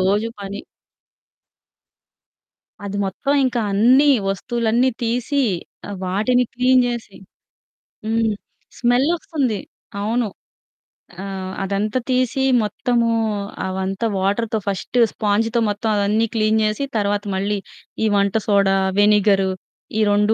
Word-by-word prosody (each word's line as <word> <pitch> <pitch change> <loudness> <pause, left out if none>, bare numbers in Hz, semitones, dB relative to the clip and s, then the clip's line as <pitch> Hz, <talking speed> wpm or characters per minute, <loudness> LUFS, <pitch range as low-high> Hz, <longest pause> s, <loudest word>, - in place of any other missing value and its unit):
రోజు 205 +4 +1
పని 200 0 -6 2.2
అది 200 0 -4
మొత్తం. 240 +9 -2
ఇంకా 250 -2 0
అన్నీ 255 +8 +5 0.2
వస్తువులన్నీ 235 +4 +1
తీసి, 245 +5 0 0.5
ఆహ్, 200 - -5
వాటిని 215 +7 +2
క్లీన్ 250 +1 +4
జేసి, 235 -4 -5 0.9
హ్మ్. 225 +1 +1 0.6
స్మెల్ 245 +3 +3
ఒస్తంది. 295 - -2 0.4
అవును. 225 +2 0 1.0
ఆహ్, 190 -1 -5
అదంతా 205 +5 -1
తీసి 255 +1 +1 0.2
మొత్తము 235 +2 0 0.6
అవంతా 190 +3 -2
వాటర్‌తో 215 +3 0
ఫస్ట్ 200 +5 -1
స్పాంజ్‌తో 225 +2 +1
మొత్తం 205 +2 -2
అవన్నీ 210 +3 +2
క్లీన్ 220 0 +2
జేసి 215 +6 0
తర్వాత 205 -1 0
మళ్ళీ 200 +2 -1 0.5
ఈ - - +3
వంట 200 -1 +2
సోడా, 195 -2 +3 0.2
వెనిగరు 205 -2 +4 0.5
ఈ - - +3
2 210 +1 +3
215 Hz, 105 wpm, -20 LUFS, 200-240 Hz, 2.2 s, అన్నీ